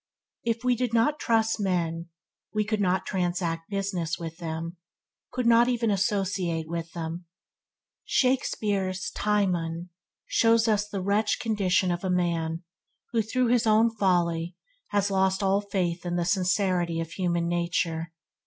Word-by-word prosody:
If 230 0 -1
we 250 -1 +3
did 240 -1 -1
not 290 +7 +2
trust 225 -1 +1
men, 170 -4 -1 0.5
we 215 0 +2
could 215 0 -1
not 185 -1 +1
transact 175 -3 -2
business 195 -5 -2
with 165 -1 -7
them, 165 0 -5 0.5
could 250 -1 -2
not 235 +1 +6
even 235 -3 +1
associate 190 -4 0
with 165 0 -4
them. 170 +1 -5 0.8
Shakespeare's 205 -8 0
"Timon" 180 -5 0 0.3
shows 230 0 +3
us 210 -1 +1
the 195 -3 -3
wretched 205 +3 +1
condition 195 -5 +1
of 175 +1 -3
a 190 - -1
man 170 -2 0 0.5
who, 230 -2 +2
through 240 +3 0
his 240 -1 +3
own 220 +2 +5
folly, 175 -4 +1 0.3
has 205 -1 0
lost 190 0 +2
all 195 +1 +3
faith 185 -4 -2
in 175 -1 -2
the 175 -1 0
sincerity 180 -2 +1
of 165 0 -4
human 170 -2 0
nature. 170 -1 -1
185 Hz, 145 wpm, -27 LUFS, 170-215 Hz, 0.8 s, not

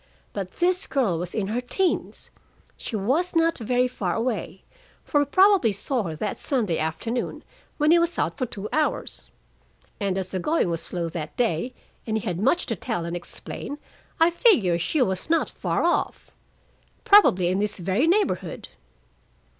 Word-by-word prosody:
But 195 -2 -5
this 365 +2 +1
girl 225 - 0
was 175 +1 -3
in 215 - 0
her 235 +3 -1
teens; 365 +9 -2 0.4
she 230 - -6
was 275 - 0
not 330 -1 +2
very 245 +2 +1
far 190 -8 -3
away, 225 -5 -3 0.4
for 290 - +1
he 290 - +1
probably 375 - +5
saw 240 +6 -2
her 165 -6 -4
that 205 +6 -3
Sunday 220 - -1
afternoon, 225 +10 -3 0.3
when 300 +1 +3
he 340 - +6
was 340 0 0
out - - 0
for 255 - -2
two 205 -1 -6
hours. 310 0 -1 0.7
And 195 -2 -1
as 190 -1 -2
the 185 - -3
going 300 - +1
was 165 -1 +1
slow 170 0 -2
that 160 -2 -6
day, 235 +1 0 0.3
and 220 0 0
he 220 - -5
had 180 -4 -2
much 275 - +2
to 230 - -2
tell 170 -2 -3
and 170 +1 -4
explain, 175 +10 -7 0.4
I 330 +1 +5
figure 305 - +4
she 260 - +1
was 190 - -2
not 330 0 +2
far - - -1
off. - - -1 0.7
Probably 190 - +6
in 185 +2 0
this 210 0 -1
very 195 - +1
neighborhood." 330 - 0
225 Hz, 170 wpm, -24 LUFS, 185-305 Hz, 0.7 s, he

